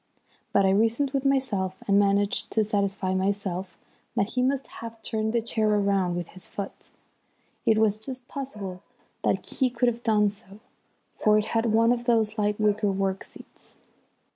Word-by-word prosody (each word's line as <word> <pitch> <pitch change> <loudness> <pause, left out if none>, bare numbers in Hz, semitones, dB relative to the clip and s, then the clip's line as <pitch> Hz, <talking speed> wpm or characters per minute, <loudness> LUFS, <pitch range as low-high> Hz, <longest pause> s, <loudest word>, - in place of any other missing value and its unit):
But 200 - +4
I 190 - +4
reasoned 230 +7 +2
with 275 0 -1
myself 225 -9 +1
and 200 0 +5
managed 200 0 +1
to 220 - +3
satisfy 200 -2 0
myself 190 -2 -2 0.4
that 200 - +1
he 250 - 0
must 270 +1 0
have 230 0 -8
turned 220 -1 -1
the 230 -1 0
chair 220 -1 0
round 195 -3 +1
with 175 -1 -4
his 185 - -7
foot. 200 -1 -7 0.8
It 220 -1 +5
was 215 -1 +3
just 250 +3 -7
possible 210 -10 -6 0.4
that - - 0
he 260 -2 +1
could 245 0 0
have 235 0 -5
done 210 -3 +3
so, 200 -1 -12 0.5
for 215 0 +3
it 215 - +1
had 225 0 +2
one 225 +1 +4
of 240 -1 -1
those 220 -2 +2
light 210 0 0
wicker 210 -1 +2
work 195 0 -1
seats. - - -14
210 Hz, 170 wpm, -26 LUFS, 200-230 Hz, 0.8 s, and